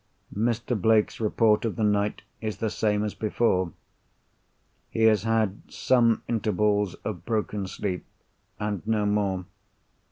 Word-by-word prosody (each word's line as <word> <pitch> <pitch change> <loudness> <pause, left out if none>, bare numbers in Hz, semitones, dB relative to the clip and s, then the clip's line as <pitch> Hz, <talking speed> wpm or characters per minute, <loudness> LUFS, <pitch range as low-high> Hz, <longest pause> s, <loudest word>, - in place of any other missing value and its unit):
Mr. 120 +3 0
Blake's 110 +1 +2
report 110 -1 +3
of 115 -3 -1
the 110 - -1
night 105 0 +1 0.2
is 110 -1 -3
the 110 -2 -2
same 105 -1 +1
as 105 - -2
before. 105 -5 +1 1.2
He 115 - -1
has 110 -3 +5
had 110 -3 +1
some 120 -3 +3
intervals 105 -3 +1
of - - -4
broken 105 -3 -2
sleep, 95 -1 -3 0.6
and 105 -3 -2
no 110 -2 +1
more. 100 -3 0
105 Hz, 130 wpm, -26 LUFS, 105-110 Hz, 1.2 s, has